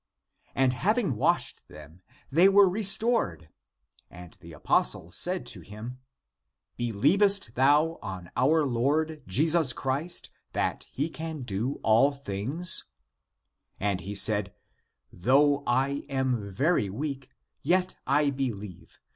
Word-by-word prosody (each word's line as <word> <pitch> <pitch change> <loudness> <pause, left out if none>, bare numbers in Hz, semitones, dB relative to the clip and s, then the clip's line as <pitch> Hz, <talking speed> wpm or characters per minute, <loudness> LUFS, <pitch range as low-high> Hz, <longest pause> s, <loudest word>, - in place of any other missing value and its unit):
And 130 -1 +2
having 200 - 0
washed 105 - 0
them 80 +4 -14 0.3
they 170 +7 +5
were 200 0 +6
restored. 205 - +1 0.6
And 90 -1 -13
the 85 -1 -12
apostle 80 +1 -1
said 180 - -1
to - - -12
him, 115 +5 -9 0.4
" - - -57
Believest 170 - +2
thou 145 +6 +2
on 95 -5 -8
our 150 +4 +2
Lord 150 +5 -1
Jesus 155 - +3
Christ, 140 +8 -2 0.2
that - - -2
he 145 +4 -2
can 160 -3 -7
do 115 +5 -3
all 115 +6 +4
things? 140 - 0 0.5
" - - -47
And 100 -2 -1
he 100 +3 -6
said, 105 0 +3 0.3
" - - -51 0.2
Though 140 +8 +2
I 135 +3 0
am 130 -6 -2
very 120 - 0
weak, 135 +4 -5 0.3
yet 180 +4 0
I 145 +1 +2
believe. 105 -9 -6
135 Hz, 125 wpm, -27 LUFS, 105-160 Hz, 0.6 s, were